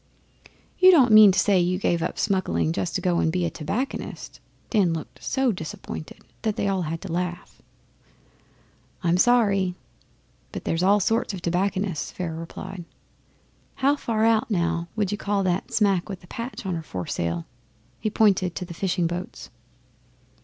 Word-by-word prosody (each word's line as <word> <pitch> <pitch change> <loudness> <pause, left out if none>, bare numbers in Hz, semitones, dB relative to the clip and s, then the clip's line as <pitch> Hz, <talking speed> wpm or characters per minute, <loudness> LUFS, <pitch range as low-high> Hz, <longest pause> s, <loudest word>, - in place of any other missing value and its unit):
'You 370 0 +8
don't 275 -10 +6
mean 215 -2 +9
to 185 - -2
say 195 0 +4
you 180 +1 +1
gave 175 -3 0
up 165 - -3
smuggling 85 - 0
just 95 +1 -2
to - - 0
go 180 -2 +1
and 160 - +2
be 180 0 0
a - - -2
tobacconist!' 210 - -4 0.3
Dan 195 -7 +3
looked 160 -2 -7
so 265 -2 +1
disappointed 160 -3 -7 0.2
they 210 -2 -1
all 195 -2 0
had 165 0 -4
to - - -7
laugh. 175 +1 -4 1.4
'I'm 170 0 +3
sorry; 200 -4 +3 0.8
but - - -7
there's 165 - 0
all 200 +3 +4
sorts 225 +1 0
of 180 - -9
tobacconists,' 180 -2 -1
Pharaoh 165 -3 -4
replied. 185 +2 -7 0.9
'How 275 +2 +2
far 225 -5 0
out, 230 +2 +2
now, 170 -3 0
would 210 -3 0
you 205 - -3
call 200 -1 0
that 180 0 -1
smack 200 -4 +2
with 190 -3 -6
the - - -15
patch 235 +1 -6
on 190 - -1
her 165 - -3
foresail?' 85 - -3 0.5
He 215 - -1
pointed 195 -5 +2
to 180 - -4
the 175 - -8
fishing 175 0 -1
boats. 175 +2 -5
185 Hz, 165 wpm, -24 LUFS, 170-210 Hz, 1.4 s, mean